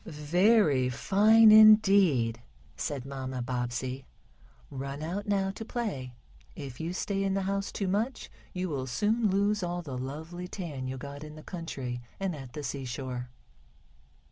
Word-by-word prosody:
"Very 155 - +3
fine 215 - +5
Indeed," 195 - +6 0.3
said 135 -3 -4
Mamma 130 -2 -4
Bobbsey. 125 +1 -3 0.6
"Run 140 +2 -5
out 185 +6 -4
now 195 -1 +1
to 210 - -7
play. 190 - -4 0.4
If 135 -4 -8
you 165 +1 -3
stay 195 +2 -2
in 195 0 0
the 195 - 0
house 195 +1 -2
too 200 - -2
much 220 +7 -2 0.2
you 185 0 -3
will 135 -5 -3
soon 215 - +1
lose 200 +2 +1
all 175 0 -3
the 130 -5 -5
lovely 160 +7 -6
tan 155 -9 -5
you 130 +1 -4
got 140 +2 -8
in 150 0 -9
the 155 - -11
country, 135 -9 -5 0.2
and 195 -4 -2
at 135 -4 -10
the 150 - -6
seashore." 130 -2 -4
155 Hz, 150 wpm, -29 LUFS, 130-195 Hz, 0.6 s, Indeed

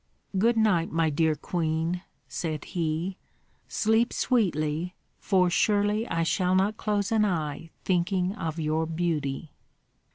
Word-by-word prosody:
"Good 230 +5 +3
night, 195 -7 +3
my 165 -1 +2
dear 155 +1 +2
queen," 165 +2 -1 0.3
said 155 -3 -3
he, 170 +2 -2 0.5
"sleep 220 +2 +2
sweetly, 175 - 0 0.2
for 185 -2 +3
surely 210 +3 +2
I 165 -1 0
shall 180 +3 +1
not 195 +3 +2
close 205 0 -1
an 220 -1 +4
eye 165 -5 -2 0.2
thinking 185 +1 +1
of 165 -5 -4
your 160 +1 0
beauty." 160 -3 -2
175 Hz, 125 wpm, -27 LUFS, 160-205 Hz, 0.5 s, an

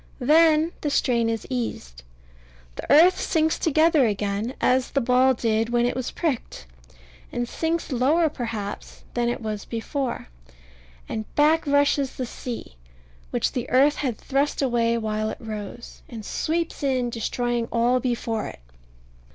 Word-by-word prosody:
Then 310 +4 +4
the 295 - -1
strain 235 -5 +1
is 225 -1 -3
eased. - - -4 0.7
The - - -5
earth 335 +6 +7
sinks 320 -1 +1
together 315 -3 +4
again, 205 +3 -2
as 255 0 +2
the 275 - +1
ball 255 +1 +3
did 225 -1 0
when 240 0 +2
it 245 - 0
was 255 -1 -3
pricked; 275 - -3 0.7
and 240 0 -2
sinks 325 +4 -2
lower, 285 +7 +3
perhaps, 230 -8 -6
than 240 -1 0
it 240 - -3
was 215 -2 -3
before: 240 - -4 0.8
and 220 -1 -4
back 305 +2 +3
rushes 285 -1 +2
the 255 - -3
sea, 235 - -7 0.5
which - - 0
the 245 - -4
earth 280 +4 +4
had 250 -6 -2
thrust 280 +1 -1
away 235 -3 +1
while 215 -1 -2
it - - -5
rose, 215 +1 -8
and 225 -4 -8
sweeps 330 +7 -2
in, 255 -4 0
destroying 240 +1 -1
all 240 +2 +2
before 230 -3 -2
it. - - -10
245 Hz, 145 wpm, -24 LUFS, 230-285 Hz, 0.8 s, earth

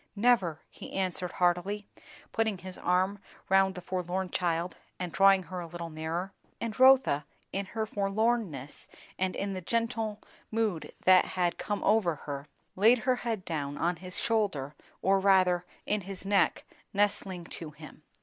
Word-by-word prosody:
"Never!" 200 -8 +2
he - - -10
answered 185 -2 -1
heartily, 180 +4 +1 0.4
putting 220 -3 0
his 185 0 -7
arm 185 +3 +1 0.3
round 190 0 +4
the 180 - -6
forlorn 185 0 -2
child 175 0 -1 0.2
and 180 -2 -4
drawing 195 +1 +5
her 185 +1 -6
a 170 - -5
little 170 0 -6
nearer. 165 +5 -3 0.3
And 230 -2 -3
Rotha, 260 - +6 0.3
in 195 0 -2
her 220 +2 -2
forlornness 200 - -1 0.3
and 185 0 0
in 200 0 -2
the 185 - -4
gentle 225 +1 -1 0.3
mood 215 -7 -1
that 185 0 +7
had 175 -2 -1
come 205 -1 -2
over 205 -6 +3
her, 140 0 -5 0.3
laid 225 +6 +6
her 255 -1 +3
head 225 -6 -3
down 145 -3 -3
on 175 +1 0
his 180 +2 -6
shoulder, 195 - 0 0.3
or 195 +1 +4
rather 185 -2 +4 0.2
in 210 0 0
his 195 0 -8
neck, 200 -1 +2 0.3
nestling 200 -3 0
to 165 -1 -7
him. 155 0 -13
190 Hz, 155 wpm, -30 LUFS, 175-205 Hz, 0.4 s, that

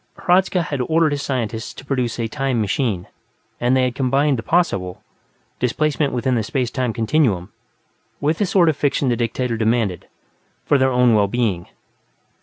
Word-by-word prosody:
Hradzka 180 0 +2
had 145 -4 -3
ordered 160 +4 +2
his 145 -1 -2
scientists 120 -5 -3
to 130 - -11
produce 125 -4 -2
a 115 - -1
"Time 135 -1 -1
Machine", 105 -3 -1 0.5
and 125 +2 +2
they 130 - +3
had 125 -1 0
combined 135 +1 +1
the - - -2
possible 105 - 0 0.6
displacement 145 +3 0
within 125 +1 0
the 120 - +1
space 125 +2 -2
time 130 -3 -1
continuum 110 - 0 0.7
with 155 +3 0
the 205 - +1
sort 180 -2 +3
of 160 - +3
fiction 140 -1 0
the 120 - +2
dictator 120 0 -2
demanded, 110 -5 0 0.6
for 145 - +3
their 130 0 +3
own 125 -1 +4
well 105 -2 +3
being. 100 -6 -1
125 Hz, 170 wpm, -20 LUFS, 115-145 Hz, 0.7 s, own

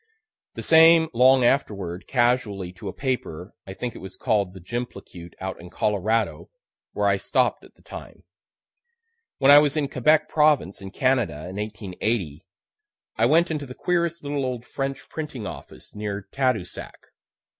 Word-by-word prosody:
The - - -6
same 160 0 +6
long 130 +1 +5
afterward, 100 -9 -1
casually, 120 -7 0
to 95 +2 -9
a - - -3
paper 100 - -4
I 95 - -7
think 120 +2 -4
it - - -10
was 95 0 -9
call'd 100 -6 0
the - - -9
"Jimplecute" 90 -4 -7
out 95 -2 -5
in 90 - -11
Colorado 105 +4 -1 0.4
where - - -1
I - - +3
stopp'd - - 0
at - - -18
the - - -26
time. - - -11 1.1
When 135 0 +5
I 145 - +10
was 150 0 +1
in 145 -2 +1
Quebec 145 +4 +2
province, 150 - +2
in 95 - -7
Canada, 105 - 0
in 95 - -8
1880, 105 -5 -3 0.7
I 115 +1 +3
went 165 +5 +3
into 145 -3 -3
the 125 - -9
queerest 170 -2 -1
little 145 -1 -2
old 125 -2 -4
French 135 +1 -4
printing 150 -8 -6
office - - -10
near 105 -1 -5
Tadousac. 125 -9 -2
120 Hz, 155 wpm, -24 LUFS, 95-140 Hz, 1.1 s, I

